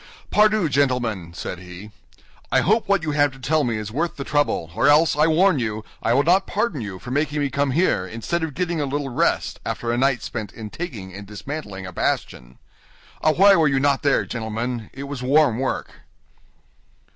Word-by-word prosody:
"Pardieu, 215 -3 +4
gentlemen," 125 - 0
said 90 - -5
he. 90 +4 -11 0.6
"I - - +4
hope 215 +2 +1
what 200 -4 +2
you 155 - -1
have 145 -1 +3
to 135 - -14
tell 150 +4 +1
me 115 -4 -1
is 110 0 -5
worth 165 +8 -2
the 140 - -5
trouble, 145 - 0
or - - +2
else, 150 +2 +5
I 150 +2 +4
warn 165 0 +3
you, 110 -2 -3 0.2
I 115 - +1
will 140 - +4
not 185 +5 +3
pardon 205 - -1
you 100 -4 -6
for 125 +6 -9
making 150 +2 0
me 140 -2 -1
come 140 +2 0
here 135 - +1
instead 115 - -3
of 160 -4 -4
getting 170 -1 -1
a 145 - -1
little 140 0 -2
rest 120 - 0
after 115 - -3
a 120 - 0
night 135 -1 +1
spent 105 -4 -5
in 110 -2 -8
taking 115 - -6
and 100 +1 -9
dismantling 105 -3 -7
a 90 - -8
bastion. 60 -6 -2 0.6
Ah, 155 - +3
why 195 +3 +6
were 160 -3 +4
you 135 -1 +2
not 140 0 +2
there, 140 -1 +2
gentlemen? 115 0 -4
It 135 - -8
was 140 -2 -6
warm 130 -2 +3
work." 130 - -2
135 Hz, 205 wpm, -22 LUFS, 110-155 Hz, 0.6 s, why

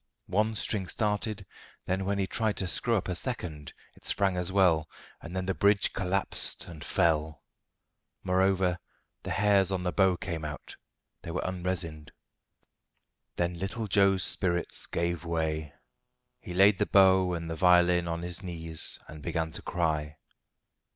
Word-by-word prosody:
One 105 +4 0
string 100 -3 0
started; 105 -1 -2 0.4
then 95 +1 -1
when 100 +1 0
he 100 - +1
tried 110 +1 0
to 95 - -1
screw 115 +6 +1
up 100 - -1
a 90 - -1
second, 85 - -4 0.2
it - - -22
sprang 100 -2 +1
as 90 0 -1
well, 85 -5 +3 0.3
and 85 +2 -8
then 95 0 -2
the 95 - 0
bridge 100 +1 +2
collapsed 95 0 0
and 80 -4 -10
fell. 80 -2 +1 0.8
Moreover, 95 -1 +2 0.4
the - - -7
hairs 100 -2 +3
on 95 -1 -1
the 90 - 0
bow 95 -2 +3
came 85 -2 -4
out. 75 0 -7 0.5
They - - -8
were 85 - -2
unresined. 90 -4 -3 1.2
Then 85 0 0
little 100 +4 -3
Joe's 100 -1 +4
spirits 90 -2 0
gave 85 0 -2
way. 80 -3 -2 0.7
He 90 - -8
laid 95 +1 +5
the 105 - +1
bow 95 -2 +5
and 85 0 -5
the 80 - -3
violin 90 0 +4
on 85 0 -3
his 90 +1 -5
knees 80 -4 -6
and 75 -1 -10
began 80 +3 -2
to - - -3
cry. 75 -3 -1
90 Hz, 155 wpm, -29 LUFS, 85-95 Hz, 1.2 s, laid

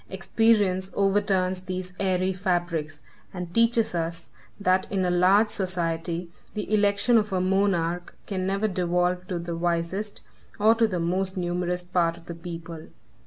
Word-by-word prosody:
Experience 190 -1 +2
overturns 195 -2 +1
these 185 -1 -5
airy 185 -1 +1
fabrics, 175 -5 -2 0.3
and 175 -1 -6
teaches 230 -1 +3
us, 165 0 -3 0.3
that 185 -2 +1
in 190 -2 +1
a 180 - +1
large 190 +5 +4
society, 170 -3 -2 0.3
the 210 0 -3
election 205 +3 +4
of 210 -1 -3
a 185 - +1
monarch 180 -2 0
can 185 -2 -2
never 200 +3 +1
devolve 180 -1 0
to 180 - -2
the 170 0 -4
wisest, 175 +5 -2 0.4
or 215 +2 +6
to 230 0 +3
the 185 -4 -2
most 185 +3 -1
numerous 180 0 -1
part 175 -2 0
of 170 - -16
the 170 - -6
people. 165 -1 -8
185 Hz, 150 wpm, -26 LUFS, 175-200 Hz, 0.4 s, or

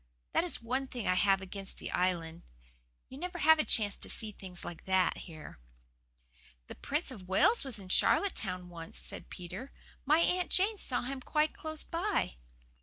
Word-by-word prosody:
That - - +3
is 350 -8 -2
one 260 +3 -1
thing 245 -4 -5
I 185 - +4
have 195 +1 +4
against 195 +1 -6
the - - -6
Island 170 -3 0 0.7
you 265 - -10
never 355 +1 -4
have 315 0 +6
a - - +4
chance 205 -7 +2
to - - -2
see 220 -2 +1
things 185 -3 -8
like 170 - -7
that 190 -1 +3
here." 155 - -10 1.1
"The - - -8
Prince 295 +1 -2
of 195 -7 -10
Wales 320 - +4
was 265 -5 -1
in 190 -2 -9
Charlottetown 185 - +2
once," 165 -1 -6
said - - -7
Peter. 185 +9 -7 0.3
"My 300 +3 +5
Aunt 355 +1 +2
Jane 405 +3 +3
saw 255 - -1
him 265 +1 -4
quite 305 +3 +1
close 315 -1 -6
by." 345 - -1
230 Hz, 180 wpm, -32 LUFS, -, 1.1 s, have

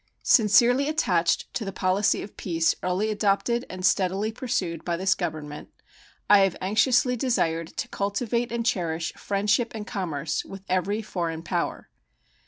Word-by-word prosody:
Sincerely 245 +5 +4
attached 180 - +1
to 255 - -2
the 195 - -4
policy 190 +2 +1
of 200 - -11
peace 165 -2 +1
early 185 +4 0
adopted 215 +4 0
and 185 0 -4
steadily 195 +4 +1
pursued 220 -9 -3
by 170 -1 -2
this 190 +1 +2
Government, 155 -4 -5 0.6
I 205 - +7
have 195 -2 +2
anxiously 245 +6 +2
desired 170 -10 -1
to - - -2
cultivate 230 +4 -2
and 235 -1 -2
cherish 170 -6 -1
friendship 210 +4 0
and 210 -1 -5
commerce 165 -7 -3
with 195 -1 -10
every 195 +4 0
foreign 165 -5 -4
power. 165 - -3
195 Hz, 145 wpm, -25 LUFS, 175-225 Hz, 0.6 s, I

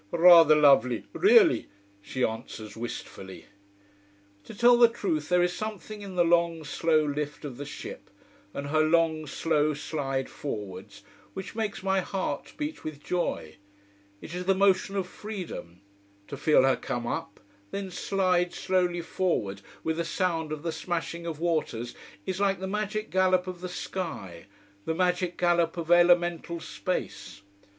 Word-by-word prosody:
Rather 165 - +8
lovely 140 -5 +4
really," 410 -4 +5 0.3
she 125 +5 -3
answers 110 -1 -6
wistfully. 110 -4 -7 1.0
To - - -10
tell 240 +3 +6
the 240 0 +7
truth 170 -10 -2
there 180 0 +4
is 175 0 +1
something 215 0 -6
in 195 -2 -8
the 175 - +4
long, 170 -1 +2
slow 155 +1 +1
lift 150 +1 -4
of 130 -4 -7
the 145 0 -6
ship, - - -8 0.4
and 140 +5 -5
her 155 +1 +3
long, 160 -1 +2
slow 150 0 +1
slide 135 -3 -3
forwards 105 -9 -7 0.3
which 190 - -6
makes 215 -4 -3
my 190 0 +2
heart 185 -6 -3
beat 300 +1 -4
with 150 -2 -7
joy. 150 - -2 0.6
It 165 - -9
is 180 0 -4
the 195 +1 +3
motion 195 0 +2
of 195 -2 0
freedom. 180 - -8 0.5
To - - -5
feel 145 0 +4
her 135 -1 +4
come 120 -1 -4
up 100 -3 -4 0.3
then 195 - -5
slide 180 -1 0
slowly 180 -2 0
forward, 135 - -1 0.2
with 160 +1 -1
a - - +1
sound 165 -3 -1
of 155 0 -5
the 165 - -1
smashing 170 +1 -4
of 160 -2 -5
waters, 155 -9 -1 0.3
is 190 0 -3
like 195 -1 +1
the 190 - -4
magic 210 +2 -3
gallop 185 -1 +3
of 180 -1 -7
the 180 - -5
sky, 100 - -6 0.4
the 160 - -1
magic 180 0 0
gallop 175 -1 +2
of 170 0 -3
elemental 175 -1 +4
space. 105 - -5
170 Hz, 155 wpm, -27 LUFS, 150-185 Hz, 1.0 s, Rather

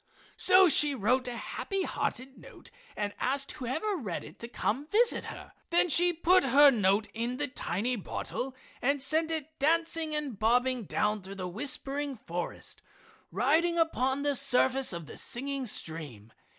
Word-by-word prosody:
So 375 0 +6
she 295 -2 +3
wrote 250 +3 +1
a 245 - -4
happy 390 - -3
hearted 270 -4 -3
note - - -13 0.3
and 205 -1 -2
asked 275 +1 -1
whoever 305 - -3
read 205 - -4
it - - -13
to 235 - -6
come 235 -1 -1
and 295 +2 -13
visit 465 +3 +3
her. - - -9 0.2
Then 345 +1 +3
she 350 +3 +5
put 350 +2 +3
her 280 +2 +7
note 205 -2 +2
in 235 +3 -3
the - - -1
tiny 245 -2 -2
bottle 255 +5 -5 0.3
and 280 +3 +1
sent 315 +5 +1
it 315 -1 -5
dancing 325 +1 +1
and 280 -9 -4
bobbing 245 +1 +2
down 210 +2 0
through 190 +1 -9
the 185 -2 -5
whispering 275 +7 -2
forest, 175 -5 -6 0.5
riding 315 - +2
upon 280 -4 +1
the 290 0 +1
surface 265 0 +2
of 170 -3 -6
the - - -11
singing 270 +1 -1
stream. 145 - -3
265 Hz, 165 wpm, -29 LUFS, 225-305 Hz, 0.5 s, her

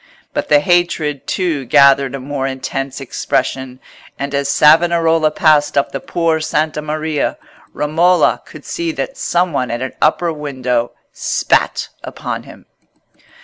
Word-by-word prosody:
But - - -3
the 145 -1 +5
hatred, 165 -4 0
too, 170 -7 -1
gathered 140 0 +4
a - - -5
more 135 0 -3
intense 135 +1 -4
expression; 130 -1 -2 0.4
and 140 +1 -4
as 140 0 0
Savonarola 165 +1 +4
passed 150 -2 +2
up 140 - +1
the 135 - -4
Por' 165 +2 0
Santa 155 0 -1
Maria, 155 0 -2 0.3
Romola 170 +5 +2
could - - -13
see 340 -1 -3
that - - -4
some 175 - 0
one 130 -3 -1
at 120 +2 -3
an 130 - -5
upper 165 +2 +2
window 130 -5 -2 0.2
spat - - 0
upon - - -5
him. - - -15
150 Hz, 140 wpm, -17 LUFS, 135-165 Hz, 0.4 s, the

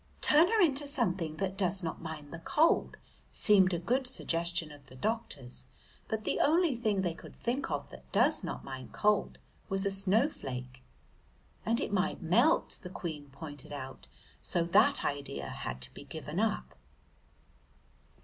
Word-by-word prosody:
"Turn 310 +4 +6
her 450 +3 +2
into 290 -6 +3
something 180 - -1
that 195 -1 -2
does 190 -1 0
not 165 - -4
mind 155 -2 -7
the 170 - -6
cold," 310 - +2 0.3
seemed 195 -3 +6
a 175 - 0
good 250 +10 0
suggestion 170 -9 0
of 145 -1 -13
the 130 - -14
doctor's, 145 - -3 0.4
but 220 0 -2
the - - -1
only 325 -2 +3
thing 215 -5 0
they 175 -3 0
could - - -13
think 245 +4 -2
of - - -3
that - - -14
does - - +3
not - - -5
mind 130 -1 -8
cold 210 -1 +1 0.3
was 195 0 +2
a 200 - +1
snowflake. 185 - 0 0.9
"And 230 +2 +2
it - - -3
might 190 -1 +1
melt," 230 - +3
the 180 - -7
Queen 155 -6 -6
pointed 145 0 -9
out, 135 -2 -7 0.3
so 170 - +1
that 210 +11 +4
idea 140 -1 -3
had 65 - -5
to 65 - -4
be - - -10
given - - -5
up. 65 0 0
185 Hz, 160 wpm, -31 LUFS, 150-230 Hz, 0.9 s, Turn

